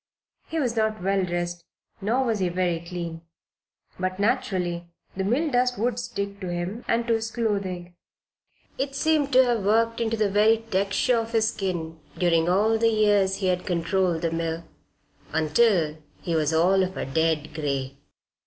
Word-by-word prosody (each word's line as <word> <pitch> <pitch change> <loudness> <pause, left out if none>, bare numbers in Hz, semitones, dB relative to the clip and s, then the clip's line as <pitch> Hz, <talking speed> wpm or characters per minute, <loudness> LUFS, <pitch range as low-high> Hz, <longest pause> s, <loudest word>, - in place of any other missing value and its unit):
He 325 - -2
was 245 -5 0
not 220 -3 0
well 195 0 +1
dressed, 175 -1 -3 0.4
nor 240 +7 +1
was 225 -3 0
he 185 -2 +1
very 175 -1 0
clean. 170 -1 -6 0.8
But 185 0 -2
naturally 180 -5 0 0.3
the 190 - -2
mill 275 +10 +1
dust 250 0 +2
would 240 +2 0
stick 200 -4 -4
to 185 - -5
him 175 +7 -4
and 230 0 +1
to 235 - +2
his 225 0 -1
clothing. 195 -6 -2 0.9
It 275 0 -2
seemed 300 -1 +2
to 260 +1 +7
have 235 -4 0
worked 230 +3 +2
into 225 0 0
the 215 -1 +2
very 215 +3 +4
texture 200 +5 +2
of 225 0 -5
his 220 -1 +3
skin 170 -5 -3 0.2
during 170 -1 +2
all 215 +5 +3
the 230 0 +4
years 205 -3 +3
he 195 - -3
had 180 0 0
controlled 175 0 0
the 165 - +1
mill, 165 0 -2 0.7
until 160 0 +2 0.2
he 170 - -3
was 155 -2 +1
all 180 +4 +4
of 185 0 -2
a - - -2
dead 160 +2 0
gray. 140 -3 -2
195 Hz, 170 wpm, -25 LUFS, 175-225 Hz, 0.9 s, to